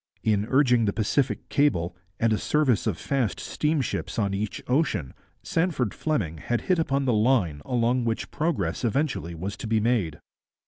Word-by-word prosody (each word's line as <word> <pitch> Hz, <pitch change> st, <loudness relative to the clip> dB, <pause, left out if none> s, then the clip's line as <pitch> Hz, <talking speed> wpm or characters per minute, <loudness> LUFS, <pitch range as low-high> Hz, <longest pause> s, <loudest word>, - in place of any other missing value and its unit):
In 105 Hz, -1 st, +1 dB
urging 125 Hz, -4 st, +4 dB
the 100 Hz, -, +1 dB
Pacific 125 Hz, +5 st, 0 dB
cable 90 Hz, -, +1 dB, 0.2 s
and 115 Hz, -1 st, +3 dB
a 105 Hz, -, 0 dB
service 135 Hz, -8 st, +2 dB
of 100 Hz, -7 st, 0 dB
fast 125 Hz, -, -1 dB
steamships 150 Hz, -3 st, -1 dB
on 100 Hz, -3 st, +1 dB
each 100 Hz, +1 st, -3 dB
ocean, 125 Hz, -, 0 dB, 0.3 s
Sandford 160 Hz, -, 0 dB
Fleming 95 Hz, -, -2 dB
had 120 Hz, +8 st, -1 dB
hit 185 Hz, -2 st, +1 dB
upon 140 Hz, -3 st, +1 dB
the 125 Hz, -, +2 dB
line 105 Hz, -, +2 dB
along 120 Hz, 0 st, +1 dB
which 115 Hz, -1 st, -2 dB
progress 115 Hz, -, -1 dB
eventually 120 Hz, -, -1 dB
was 95 Hz, +5 st, -4 dB
to 110 Hz, -, -6 dB
be 110 Hz, 0 st, +2 dB
made. 105 Hz, -9 st, 0 dB
115 Hz, 165 wpm, -26 LUFS, 100-135 Hz, 0.3 s, urging